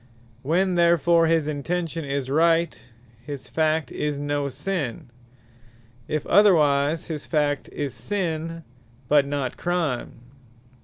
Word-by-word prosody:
When 180 +7 +1
therefore 170 -1 +4
his 160 -2 +2
Intention 165 +2 -3
is 140 -2 -3
Right, 165 +4 +2 0.4
his 140 0 -7
fact 155 -3 0
is 150 -1 -2
no 145 0 -1
Sinne: 140 -4 -4 1.0
if 155 -2 -2
otherwise, 155 -5 +4
his 155 -3 -6
fact 145 -3 0
is 145 -3 -4
Sinne; 165 -4 -3 0.4
but 145 0 +4
not 140 -3 -3
Crime. 170 -8 -2
155 Hz, 110 wpm, -24 LUFS, 145-170 Hz, 1.0 s, therefore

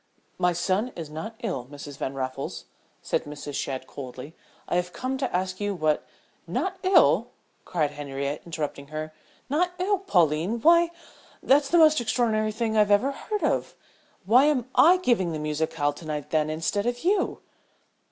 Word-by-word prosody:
"My 180 - +3
son 190 +7 0
is 160 -3 -7
not 215 +9 -6
ill, 180 - -3
Mrs. 145 -1 -9
Van 135 - -3
Raffles," 130 +1 -4 0.4
said - - -1
Mrs. 145 0 -7
Shadd, 130 -1 -3
coldly. 130 +2 -9 0.3
"I - - 0
have 180 0 -2
come 260 +1 -3
to 265 - -1
ask 185 +1 -2
you 205 -1 -1
what 155 -3 0 0.2
" - - -38
"Not 380 0 -3
ill?" 380 0 +5 0.4
cried 155 -5 0
Henriette, 140 0 -4
interrupting 150 -4 -5
her. 155 +1 -6 0.3
"Not 355 +6 +1
ill, 385 +2 +1
Pauline? 175 - +1
Why," 340 +6 +6
breathlessly 340 - -21 0.5
"that's 280 +1 +4
the 345 - +4
most 310 -4 +6
extraordinary 220 -2 +1
thing 220 0 -2
I 215 - +6
ever 210 +6 +3
heard 420 +9 -4
of. - - 0 0.5
Why 245 +8 +6
am 270 -5 +1
I 355 +4 +7
giving 230 - +1
the - - -2
musicale 150 -1 -1
to 160 - -12
night 150 -2 -4
then, 155 -1 +2
instead 165 +7 -1
of 245 +2 -2
you?" 380 +2 +1
185 Hz, 170 wpm, -26 LUFS, -, 0.5 s, I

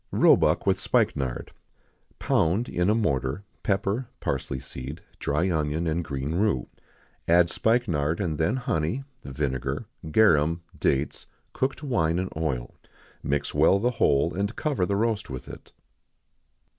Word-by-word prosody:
Roebuck - - +4
with - - +2
Spikenard. 65 -3 0 0.7
Pound, 95 +9 +1
in 90 +2 0
a 105 - +4
mortar, 70 - 0 0.2
pepper, 100 +5 0
parsley 65 -1 -2
seed, 65 +3 -7 0.2
dry 80 +6 0
onion, 80 +1 0
and 85 +1 0
green 70 0 -3
rue; 90 - +1 0.6
add 85 +1 +5
spikenard, 85 -10 +1
and 80 -7 -2
then 80 +10 +2
honey, 125 - -1 0.2
vinegar, 65 - -3 0.2
garum, 85 -3 +4 0.2
dates, 70 +2 0 0.3
cooked 135 +3 -2
wine, 85 - +1
and 95 +1 -3
oil; 70 -7 -2 0.5
mix 70 0 -1
well 80 +6 +5
the 120 +5 +1
whole, 75 +4 +3
and 100 +4 -2
cover 135 - 0
the 100 - 0
roast 110 0 0
with 65 -1 -7
it. - - -11
80 Hz, 130 wpm, -26 LUFS, 70-100 Hz, 0.7 s, add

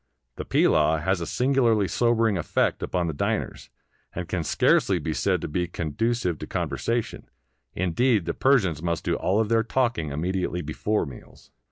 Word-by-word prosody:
The - - -5
pilaw 80 +1 +3
has 95 0 0
a 85 - -3
singularly 120 -6 +2
sobering 115 -2 +2
effect 85 - 0
upon 90 -1 -1
the 80 - -2
diners, 70 - -3 0.5
and 90 -1 -4
can 90 -2 -2
scarcely - - +2
be - - -3
said - - 0
to - - -3
be 90 +3 -2
conducive 90 +3 -2
to - - -7
conversation 115 -1 -3 0.2
— 65 -1 -49
indeed, 100 +3 +1
the - - -2
Persians 100 - +2
must 85 -1 -2
do - - 0
all 100 +4 +1
their 115 +1 +2
talking 115 - 0
immedi 90 +6 -2
ately 90 -2 -4
before 105 +8 -1
meals. 65 -5 -13
95 Hz, 170 wpm, -25 LUFS, 80-115 Hz, 0.5 s, pilaw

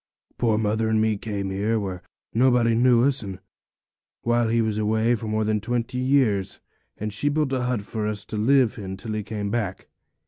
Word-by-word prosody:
'Poor 115 -3 +2
mother 110 +1 0
and 110 0 +2
me 110 0 +2
came 100 -2 -4
here, 105 +4 0
where 95 -3 -4 0.3
nobody 120 -1 +4
knew 120 0 +4
us, 140 -2 +1 1.0
while 120 0 +2
he 115 +1 +1
was 110 -2 0
away 110 +2 +2
for 115 -1 -3
more 110 0 0
than 105 -1 0
twenty 120 +2 -2
years; 125 -8 +1 0.4
and 105 0 -4
she 145 +8 +1
built 145 -2 0
a 130 - 0
hut 125 -4 -1
for 105 0 -3
us 105 -1 -4
to - - -6
live 120 +1 +3
in 95 -1 -6
till 110 +2 -6
he 105 - -1
came 105 -1 -4
back. 105 -5 -3
110 Hz, 195 wpm, -24 LUFS, 105-120 Hz, 1.0 s, nobody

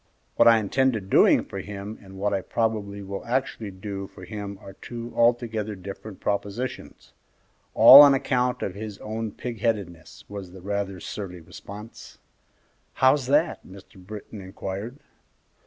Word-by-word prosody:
"What - - +5
I 115 -1 +8
intended 110 -1 0
doing - - +5
for 95 - -7
him 100 +2 -7
and 95 -1 -13
what 100 +1 -1
I 95 - 0
probably 105 -2 -2
will 100 0 -6
actually 120 -3 -2
do 100 0 -6
for 95 - -13
him 100 -1 -6
are 100 -2 -11
two 120 +3 -8
altogether 115 -3 +1
different 100 +2 -9
propositions 105 +5 -4 0.6
all 140 +2 +11
on 140 -1 +8
account 125 -2 0
of 95 - -3
his 105 0 -7
own 110 0 -5
pig 115 0 -7
headedness," 100 -8 -3
was 100 -3 -8
the 95 - -11
rather 100 -1 -3
surly 90 -1 -7
response. 100 +6 -11 0.8
"How's 130 0 +3
that?" 150 +5 +2
Mr. 95 0 -15
Britton 105 +1 -9
inquired. 95 +5 -6
105 Hz, 145 wpm, -25 LUFS, 95-115 Hz, 0.8 s, all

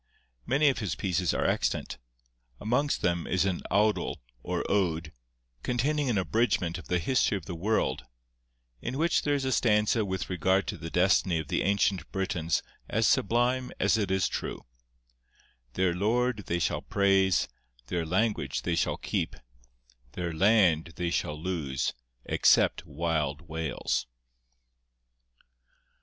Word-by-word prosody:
Many 145 +3 +3
of 130 - -1
his 100 -8 -2
pieces 90 -2 0
are - - -1
extant; 60 - -1 0.6
amongst 125 +7 0
them 85 -1 0
is 95 0 +1
an 95 -3 -1
awdl 105 +2 +2 0.3
or - - -2
ode, 85 -5 0 0.5
containing 140 - 0
an 115 - +1
abridgment 95 -4 0
of - - -12
the 90 - +1
history 105 +3 +1
of 90 - -9
the 90 - -5
world, 85 - 0 0.8
in 125 +3 -4
which 170 +3 +2
there 145 -1 +1
is 135 -1 -2
a 130 - 0
stanza 105 -2 +3
with 95 -2 -3
regard 95 +2 +1
to - - -4
the 80 - -6
destiny 90 0 +3
of 80 -3 -4
the - - 0
ancient 95 -3 +1
Britons 85 -5 -1 0.3
as - - +1
sublime 125 +4 +2
as - - +3
it 105 -3 0
is 95 -2 +2
true:— - - -5 1.1
'Their 90 +4 +1
Lord 110 +3 0
they 85 - 0
shall 85 - 0
praise, 95 -2 +2 0.4
Their 85 +6 -2
language 105 +7 0
they - - 0
shall - - 0
keep, - - -2 0.8
Their 85 -2 -3
land 85 -3 +3
they 85 -1 -2
shall 75 -3 -2
lose 75 -7 -2 0.3
Except - - +3
wild 75 -1 -1
Wales. 80 -6 -2
95 Hz, 140 wpm, -28 LUFS, 85-110 Hz, 1.1 s, Many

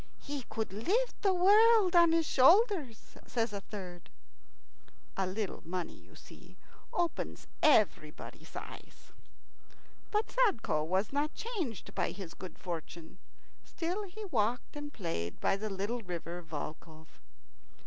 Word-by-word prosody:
"He 280 -3 -5
could 220 -4 -3
lift 415 - 0
the 395 - +4
world 405 +1 +6
on 340 -1 +7
his 330 -1 +3
shoulders," 305 - +4
says 230 -2 -1
a 200 - -3
third. 185 -4 -8 1.1
A 190 -1 0
little 195 +1 -3
money, 180 0 -4
you - - -18
see, - - -15 0.3
opens 345 -1 -2 0.2
everybody's 210 - +2
eyes. - - -10 1.0
But 425 +1 0
Sadko 390 - +2
was 190 - 0
not 295 +2 0
changed 355 - -4
by - - 0
his 185 -3 -8
good 185 - -9
fortune. 170 0 -7 0.4
Still 355 +5 -3
he 420 +3 -8
walked 245 - 0
and 295 0 -6
played 165 - -4
by - - +2
the 215 +2 -4
little 205 +5 -2
river 175 -2 -5
Volkhov. 160 0 -8
225 Hz, 130 wpm, -32 LUFS, -, 1.1 s, on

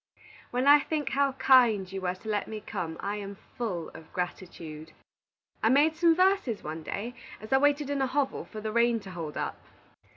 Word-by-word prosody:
"When 250 +2 -1
I 290 +1 +8
think 300 0 -2
how 275 -1 +1
kind 235 -8 +4
you 195 0 -5
were 180 0 -1
to 185 - -14
let 210 -2 -1
me 220 -1 -5
come, 160 -5 -5
I 205 +1 -2
am 200 -1 -7 0.2
full 185 -9 -3
of 160 0 -14
gratitude. 165 -3 -6 0.7
I 220 - +3
made 295 +5 +4
some 335 0 +4
verses, 370 - +2
one 155 +1 -5
day, 215 +9 -5 0.3
as 215 +4 -5
I 265 - +6
waited 290 0 +2
in 280 -1 0
a 265 - +2
hovel 275 +1 -1
for 215 - -8
the 215 0 -3
rain 235 0 +3
to 190 - -10
hold 165 -4 -6
up. - - -3
220 Hz, 200 wpm, -28 LUFS, 185-275 Hz, 0.7 s, I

